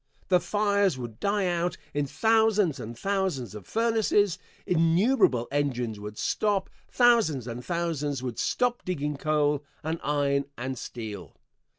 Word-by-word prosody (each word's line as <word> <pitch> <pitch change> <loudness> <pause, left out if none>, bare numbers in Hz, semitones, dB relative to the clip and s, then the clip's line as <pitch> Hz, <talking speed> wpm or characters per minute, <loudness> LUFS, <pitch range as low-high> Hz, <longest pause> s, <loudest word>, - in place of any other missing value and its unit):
The 180 -1 +5
fires 200 -2 +1
would 120 -3 -7
die 200 -1 +1
out 175 0 0 0.2
in 145 -1 0
thousands 220 -3 +2
and 115 +1 -7
thousands 190 - -1
of 105 -3 -10
furnaces, 220 -4 +2 0.3
innumerable 165 - +3
engines 125 -7 -1
would 105 +1 -8
stop, 205 -3 0 0.2
thousands 230 - +3
and 120 0 -6
thousands 155 -6 -2
would 125 -3 -4
stop 245 -1 0
digging 150 -5 -2
coal 150 0 +1 0.2
and 160 +2 -2
iron 140 -1 +1
and 130 +2 -3
steel. 105 - -7
155 Hz, 130 wpm, -27 LUFS, 130-200 Hz, 0.3 s, The